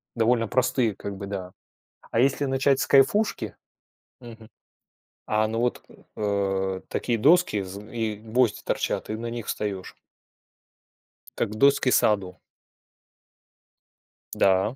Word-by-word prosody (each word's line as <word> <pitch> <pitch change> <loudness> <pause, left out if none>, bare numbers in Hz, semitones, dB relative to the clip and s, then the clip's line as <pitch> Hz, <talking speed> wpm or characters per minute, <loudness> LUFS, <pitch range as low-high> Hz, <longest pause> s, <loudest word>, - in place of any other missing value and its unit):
довольно 115 0 +2
простые, 125 -3 +1
как 100 -1 -6
бы, 100 0 -7
да. 95 -2 -5 0.6
А - - +1
если 135 +3 +2
начать 135 +1 +2
с - - -1
кайфушки 170 +11 +2 0.6
Мгм. 115 -3 -12 0.8
А, 110 0 +3
ну 115 +1 -2
вот, 120 0 -1 0.3
э, 95 -2 -1
такие 120 - -1
доски 145 - +4
зн 100 +3 -9
и 110 -3 -3
гвозди 115 +2 0
торчат, - - -2
и - - -1
на 115 +1 -5
них 120 -2 -6
встаешь. 100 -3 -4 1.4
Как - - 0
в 105 - -7
доски 140 +1 +4
саду. 100 -6 +2 1.9
Да. 95 +4 +2
110 Hz, 120 wpm, -25 LUFS, 100-125 Hz, 1.9 s, доски